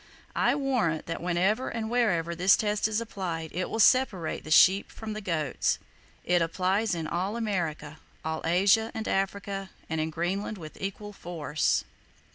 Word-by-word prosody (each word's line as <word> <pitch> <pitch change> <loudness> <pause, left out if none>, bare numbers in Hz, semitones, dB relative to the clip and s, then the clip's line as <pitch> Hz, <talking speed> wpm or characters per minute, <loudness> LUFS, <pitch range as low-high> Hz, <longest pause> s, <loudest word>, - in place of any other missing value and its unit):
I - - +3
warrant 250 - 0
that 165 - -4
whenever 185 +8 +1
and 225 -1 -3
wherever 200 -9 +1
this 180 +3 +5
test 210 0 +1
is 215 0 0
applied 175 -8 -4
it 180 +1 -2
will - - -3
separate 215 -8 +3
the - - -9
sheep 190 +5 +6
from 220 -1 -6
the 215 - -5
goats. 155 -8 0 0.5
It 175 -1 +2
applies 185 +5 +1
in 165 -2 -3
all 185 +7 -2
America, 165 -9 -3 0.3
all 160 0 -2
Asia 195 +6 +3
and 220 - -4
Africa, 195 0 -2 0.2
and 160 -1 -1
in 160 - -1
Greenland, 185 +6 -2
with 155 -4 -10
equal 205 +2 -5
force. 165 -5 -1
190 Hz, 160 wpm, -28 LUFS, 165-215 Hz, 0.5 s, sheep